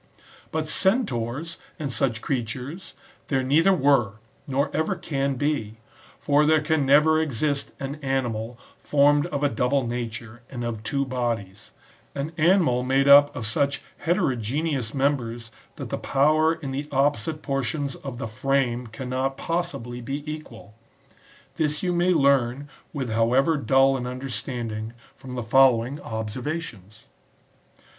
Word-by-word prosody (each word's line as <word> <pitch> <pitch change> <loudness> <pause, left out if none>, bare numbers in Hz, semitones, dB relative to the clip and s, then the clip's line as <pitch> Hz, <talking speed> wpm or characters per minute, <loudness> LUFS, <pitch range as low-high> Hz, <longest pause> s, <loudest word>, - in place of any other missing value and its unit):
But 155 -1 -2
Centaurs, 165 - 0 0.2
and 140 -4 -4
such 115 -4 0
creatures, 130 - -4 0.3
there 135 -2 0
neither 155 +8 +4
were, 140 - +3 0.3
nor 140 +2 -1
ever 175 +5 0
can 140 -6 -2
be; 130 -6 -2 0.4
for 145 0 +2
there 155 +1 +4
can 150 -2 0
never 155 +3 +5
exist 145 0 -1
an 140 +2 -5
animal 120 -4 -2 0.2
formed 145 +2 +3
of 145 -4 -3
a - - +5
double 125 +2 0
nature 115 0 -5
and 120 -3 -5
of 115 -2 -4
two 140 +6 -1
bodies; 115 -6 -3 0.5
an 140 +3 -3
animal 160 -7 +4
made 135 +2 +2
up 145 +1 +7
of 125 -5 -4
such 140 +6 0 0.2
heterogeneous 140 - -1
members 120 -5 -1 0.2
that - - -7
the - - -2
power 155 +4 +3
in 145 -5 -6
the 145 +2 -4
opposite 145 +1 0
por 135 -1 -1
tions 140 +2 -2
of 135 -3 -7
the 120 - -4
frame 125 +1 0
cannot 130 +3 -3
possibly 165 -8 -3
be 140 +4 -4
equal 140 -9 -8 0.8
This 150 0 0
you 180 -1 +1
may 175 +1 +2
learn, 140 -3 +2 0.2
with 130 -6 -4
however 125 +8 +3
dull 135 -1 +3
an 125 -1 -4
understanding,^ 120 -4 -5 0.2
from 130 -1 -9
the 120 - -3
follow 120 0 +5
ing 140 +4 -6
observations. 110 - -5
135 Hz, 140 wpm, -25 LUFS, 120-150 Hz, 0.8 s, up